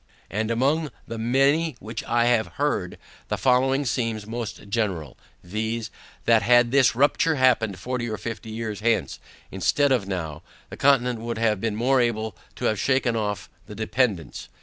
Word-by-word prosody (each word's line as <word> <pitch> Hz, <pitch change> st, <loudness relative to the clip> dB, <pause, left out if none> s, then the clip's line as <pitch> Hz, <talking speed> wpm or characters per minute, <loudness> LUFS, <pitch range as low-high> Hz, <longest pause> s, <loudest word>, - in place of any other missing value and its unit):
And 110 Hz, +2 st, -1 dB
among 140 Hz, +7 st, +1 dB, 0.2 s
the 115 Hz, -, -5 dB
many 135 Hz, +6 st, +2 dB
which 110 Hz, +1 st, -6 dB
I 120 Hz, 0 st, +2 dB
have 120 Hz, -2 st, +2 dB
heard, 140 Hz, -11 st, -1 dB, 0.3 s
the -, -, -2 dB
following 135 Hz, +2 st, +2 dB
seems 115 Hz, -4 st, -1 dB
most 115 Hz, -2 st, -6 dB
general, 95 Hz, -, -2 dB, 0.3 s
viz. 110 Hz, +4 st, -3 dB, 0.3 s
that 115 Hz, -1 st, +5 dB
had 120 Hz, 0 st, +4 dB
this 130 Hz, -5 st, +4 dB
rupture 145 Hz, +4 st, +3 dB
happened 120 Hz, -7 st, +2 dB
forty 125 Hz, 0 st, -3 dB
or 110 Hz, -, -3 dB
fifty 115 Hz, -1 st, -6 dB
years 110 Hz, -2 st, -4 dB
hence, 115 Hz, +1 st, 0 dB, 0.3 s
instead 135 Hz, -, +2 dB
of 120 Hz, -7 st, +1 dB
NOW, 80 Hz, -6 st, -4 dB, 0.3 s
the -, -, -6 dB
Continent 125 Hz, -4 st, +3 dB
would 115 Hz, 0 st, -4 dB
have 110 Hz, -3 st, +1 dB
been 115 Hz, -2 st, -1 dB
more 125 Hz, +4 st, +3 dB
able 110 Hz, -4 st, -1 dB, 0.2 s
to -, -, -4 dB
have 110 Hz, -, +1 dB
shaken 130 Hz, -3 st, +1 dB
off 105 Hz, -2 st, -2 dB, 0.2 s
the 105 Hz, -, -9 dB
dependance. 110 Hz, -, -1 dB
115 Hz, 165 wpm, -24 LUFS, 110-130 Hz, 0.3 s, that